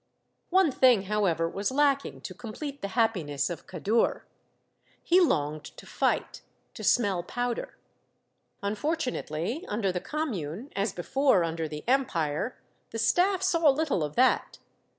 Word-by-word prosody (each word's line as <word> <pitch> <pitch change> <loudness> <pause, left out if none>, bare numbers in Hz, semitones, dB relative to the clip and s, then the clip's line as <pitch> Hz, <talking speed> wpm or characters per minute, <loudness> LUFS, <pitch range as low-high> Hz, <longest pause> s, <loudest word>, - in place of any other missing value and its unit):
One 370 -4 +4
thing, 250 -6 +4
however, 190 -5 +1
was 195 +4 -2
lacking 280 0 +1
to - - -7
complete 275 +5 -7
the 200 - -2
happiness 180 -10 +1
of 170 - -7
Kadour. 205 +6 0 0.8
He 355 +2 +5
longed 150 - +1
to - - -11
fight, - - -1 0.3
to - - -9
smell 200 -7 +2
powder. 245 +6 -4 0.9
Unfortunately, 245 - -2
under 205 -3 0
the 180 0 -3
Commune, 240 - -4
as 200 +1 0
before 205 +2 +2
under 165 -1 -2
the 150 0 -7
Empire, 225 - 0 0.3
the 225 - -6
staff 360 - +2
saw 330 -3 +4
little 285 - +1
of 150 -1 -4
that. 255 +1 +2
220 Hz, 130 wpm, -28 LUFS, 175-275 Hz, 0.9 s, He